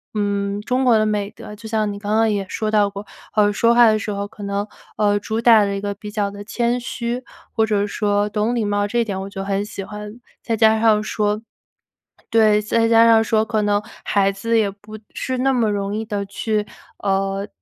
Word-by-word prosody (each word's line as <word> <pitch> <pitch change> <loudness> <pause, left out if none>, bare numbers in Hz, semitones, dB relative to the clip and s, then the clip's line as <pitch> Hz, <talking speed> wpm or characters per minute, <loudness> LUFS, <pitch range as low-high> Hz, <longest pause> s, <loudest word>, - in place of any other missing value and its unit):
嗯， 200 -1 -1
中 250 +5 -1
国 240 -3 +5
的 215 - +2
美 205 -1 -1
德。 210 - -10
就 220 +1 -10
像 215 -2 0
你 200 - -7
刚 205 +1 -3
刚 225 0 +3
也 200 -2 -1
说 215 -1 -2
到 210 -1 +3
过， 200 +1 -9 0.3
呃， 205 -1 +3
说 230 +3 +3
话 240 -1 +7
的 215 0 +4
时 210 0 -4
候 200 0 -3
可 210 -1 -12
能， 200 +1 -2 0.3
呃， 205 -1 +2
主 220 +2 -3
打 230 -2 +6
的 200 0 -1
一 - - -3
个 200 0 -3
比 210 +1 -9
较 205 -1 -1
地 200 0 -9
谦 235 +3 -1
虚， 240 0 -4 0.3
或 220 - +2
者 210 -1 0
说 205 0 0
懂 210 +3 -1
礼 235 -3 0
貌 205 0 0
这 235 +4 -1
一 235 - +2
点 190 -3 -4
我 195 - -6
就 195 0 -6
很 200 0 -1
喜 205 -1 -7
欢。 210 +2 -9 0.2
再 225 -2 -1
加 220 0 +5
上 220 -2 +4
说 210 0 -1 0.9
对， 215 -2 +4
再 225 +2 +1
加 230 0 +6
上 225 -1 +5
说 220 0 +2
可 215 -2 0
能 205 0 +1 0.2
孩 195 -1 +2
子 225 +4 0
也 205 -2 +2
不 210 +2 -12 0.2
是 260 -1 -3
那 265 +1 +2
么 230 -4 +2
容 200 0 -2
易 220 - -3
地 205 -2 -3
去， 210 +1 -2 0.3
呃， 195 0 -1
210 Hz, 240 characters per minute, -20 LUFS, 205-225 Hz, 0.9 s, 话